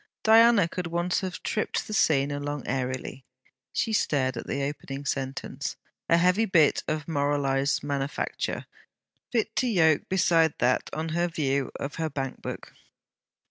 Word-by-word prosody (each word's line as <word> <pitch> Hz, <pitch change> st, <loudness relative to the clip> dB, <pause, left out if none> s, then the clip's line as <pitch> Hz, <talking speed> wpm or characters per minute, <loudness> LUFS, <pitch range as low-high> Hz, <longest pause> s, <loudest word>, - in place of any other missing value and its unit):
Diana 225 Hz, -3 st, +6 dB
could 180 Hz, +1 st, -4 dB
once 175 Hz, +2 st, 0 dB
have 185 Hz, -2 st, -5 dB
tripped 215 Hz, -, -1 dB
the 215 Hz, -, -6 dB
scene 145 Hz, -8 st, +3 dB
along 145 Hz, 0 st, -4 dB
airily. 130 Hz, 0 st, -3 dB, 0.5 s
She 225 Hz, -, -1 dB
stared 130 Hz, -, +1 dB
at 115 Hz, -, -6 dB
the 140 Hz, -, -2 dB
opening 140 Hz, 0 st, -5 dB
sentence, 135 Hz, 0 st, -3 dB, 0.3 s
a 170 Hz, -, +5 dB
heavy 180 Hz, +5 st, +3 dB
bit 165 Hz, -7 st, +4 dB
of 155 Hz, -1 st, -2 dB
moralized 140 Hz, -2 st, 0 dB
manufacture, 140 Hz, -1 st, -3 dB, 0.7 s
fit 225 Hz, -2 st, 0 dB
to 255 Hz, -, +2 dB
yoke 160 Hz, -9 st, +3 dB
beside 165 Hz, -4 st, +3 dB
that 125 Hz, +1 st, +1 dB
on 160 Hz, +1 st, -3 dB
her 170 Hz, +2 st, +1 dB
view 140 Hz, -5 st, -1 dB
of 140 Hz, -, -5 dB
her 160 Hz, -1 st, -1 dB
bank 135 Hz, -2 st, -4 dB
book. -, -, -7 dB
150 Hz, 145 wpm, -27 LUFS, 140-175 Hz, 0.7 s, Diana